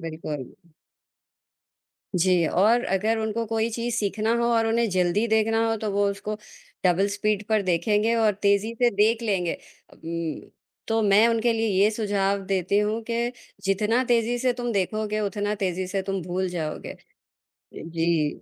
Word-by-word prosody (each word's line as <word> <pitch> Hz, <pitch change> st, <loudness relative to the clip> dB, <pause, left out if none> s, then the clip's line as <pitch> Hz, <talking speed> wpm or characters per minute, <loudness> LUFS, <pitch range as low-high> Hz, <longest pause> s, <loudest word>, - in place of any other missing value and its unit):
बिल्कुल। 155 Hz, -5 st, -6 dB, 1.6 s
जी, 175 Hz, -1 st, +3 dB
और 220 Hz, +9 st, +3 dB
अगर 215 Hz, +4 st, 0 dB
उनको 220 Hz, +1 st, -2 dB
कोई 225 Hz, +1 st, 0 dB
चीज़ 235 Hz, +1 st, -3 dB
सीखना 215 Hz, +1 st, 0 dB
हो 235 Hz, -, +1 dB
और 225 Hz, -1 st, +2 dB
उन्हें 230 Hz, +1 st, +1 dB
जल्दी 185 Hz, +4 st, +1 dB
देखना 225 Hz, +1 st, +2 dB
हो 225 Hz, -, 0 dB
तो 210 Hz, -, 0 dB
वो 205 Hz, +1 st, +2 dB
उसको 205 Hz, +2 st, -5 dB, 0.5 s
डबल 185 Hz, +2 st, +3 dB
स्पीड 205 Hz, 0 st, -1 dB
पर 215 Hz, -2 st, +2 dB
देखेंगे 205 Hz, +5 st, +1 dB
और 220 Hz, -3 st, +2 dB
तेज़ी 200 Hz, +3 st, +2 dB
से 240 Hz, -, +5 dB
देख 220 Hz, +3 st, +3 dB
लेंगे 190 Hz, -6 st, 0 dB
अ, -, -, -19 dB
उम्म, 165 Hz, -1 st, -5 dB, 0.4 s
तो 225 Hz, 0 st, +2 dB
मैं 205 Hz, +2 st, +5 dB
उनके 230 Hz, 0 st, +2 dB
लिए 225 Hz, 0 st, 0 dB, 0.2 s
ये 210 Hz, -, +5 dB
सुझाव 200 Hz, -2 st, 0 dB
देती 195 Hz, +1 st, +1 dB
हूँ 210 Hz, +2 st, 0 dB
कि 235 Hz, +1 st, -1 dB, 0.3 s
जितना 210 Hz, +5 st, +1 dB
तेज़ी 240 Hz, 0 st, +1 dB
से 250 Hz, 0 st, +1 dB
तुम 240 Hz, -1 st, -3 dB
देखोगे, 215 Hz, +2 st, -1 dB
उतना 205 Hz, +1 st, -1 dB
तेज़ी 185 Hz, -2 st, -2 dB
से 190 Hz, +1 st, -2 dB
तुम 195 Hz, 0 st, -3 dB
भूल 180 Hz, +2 st, -2 dB
जाओगे। 160 Hz, -4 st, -4 dB
अ, -, -, -16 dB, 0.8 s
जी। 165 Hz, -2 st, -1 dB
210 Hz, 165 wpm, -25 LUFS, 185-225 Hz, 1.6 s, से